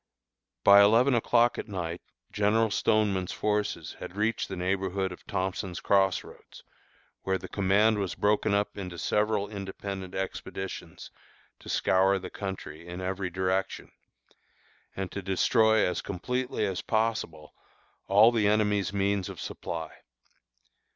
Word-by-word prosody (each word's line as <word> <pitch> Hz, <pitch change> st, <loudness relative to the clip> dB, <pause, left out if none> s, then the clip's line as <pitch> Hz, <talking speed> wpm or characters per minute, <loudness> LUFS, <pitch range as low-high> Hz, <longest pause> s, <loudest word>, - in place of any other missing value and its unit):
By 100 Hz, 0 st, +8 dB
eleven 115 Hz, +6 st, +5 dB
o'clock 120 Hz, 0 st, +3 dB
at -, -, -5 dB
night 90 Hz, -4 st, -4 dB, 0.3 s
General 105 Hz, +2 st, +2 dB
Stoneman's 100 Hz, -5 st, +1 dB
forces 105 Hz, 0 st, -2 dB
had 90 Hz, -, -8 dB
reached 110 Hz, +2 st, -1 dB
the -, -, -4 dB
neighborhood 95 Hz, +1 st, -1 dB
of 90 Hz, -, -12 dB
Thompson's 95 Hz, -2 st, -3 dB
Cross 95 Hz, -2 st, +2 dB
Roads, -, -, -15 dB, 0.6 s
where 95 Hz, 0 st, 0 dB
the -, -, -9 dB
command 105 Hz, +2 st, +2 dB
was 95 Hz, -3 st, -2 dB
broken 105 Hz, 0 st, +1 dB
up 105 Hz, 0 st, -1 dB
into 90 Hz, -3 st, -6 dB
several 105 Hz, +2 st, 0 dB
independent 95 Hz, -2 st, -6 dB
expeditions 95 Hz, 0 st, -6 dB, 0.5 s
to -, -, -12 dB
scour 95 Hz, +1 st, +3 dB
the 90 Hz, -1 st, -7 dB
country 90 Hz, -5 st, -7 dB
in 90 Hz, +1 st, -6 dB
every 95 Hz, 0 st, -3 dB
direction, 95 Hz, +2 st, -2 dB, 1.0 s
and 95 Hz, -1 st, -4 dB
to 100 Hz, -, -5 dB
destroy 110 Hz, +4 st, +3 dB
as 90 Hz, -, -1 dB
completely 125 Hz, +4 st, -2 dB
as 95 Hz, -3 st, -2 dB
possible 110 Hz, -9 st, -2 dB, 0.5 s
all 105 Hz, +4 st, +6 dB
the 110 Hz, -3 st, +2 dB
enemy's 105 Hz, -2 st, +2 dB
means 100 Hz, -1 st, 0 dB
of -, -, -8 dB
supply. 80 Hz, -1 st, -5 dB
100 Hz, 130 wpm, -28 LUFS, 95-105 Hz, 1.0 s, By